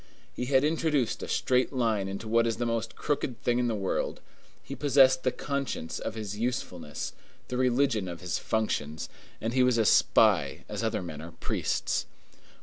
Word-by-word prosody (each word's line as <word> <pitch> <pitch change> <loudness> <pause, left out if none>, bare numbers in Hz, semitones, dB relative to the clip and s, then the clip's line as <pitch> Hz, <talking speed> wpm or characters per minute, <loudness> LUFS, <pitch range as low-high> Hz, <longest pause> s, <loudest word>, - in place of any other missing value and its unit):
He 125 - -3
had 135 +1 +3
introduced 150 -5 +1
a - - -5
straight 125 -1 +1
line 115 -7 0
into 100 +3 -5
what 115 +1 +3
is 115 - -1
the 120 - -1
most 115 -1 -2
crooked 130 -5 -2
thing 120 0 +2
in 125 - +1
the 115 - 0
world; 95 -2 -2 0.4
he 140 - -6
possessed 135 -2 +5
the 130 - +1
conscience 140 - -3
of 110 - -4
his 105 -2 -4
usefulness, 90 - -3 0.4
the 125 - -2
religion 125 -5 +2
of 85 -1 -6
his 90 -1 -2
functions, 80 -9 -2 0.3
and 115 +2 -2
he 130 - +3
was 125 -2 +4
a 110 - +3
spy - - +4
as - - -4
other - - -1
men 80 -3 -7
are 85 +2 -9
priests. - - -1
115 Hz, 180 wpm, -29 LUFS, 105-130 Hz, 0.4 s, possessed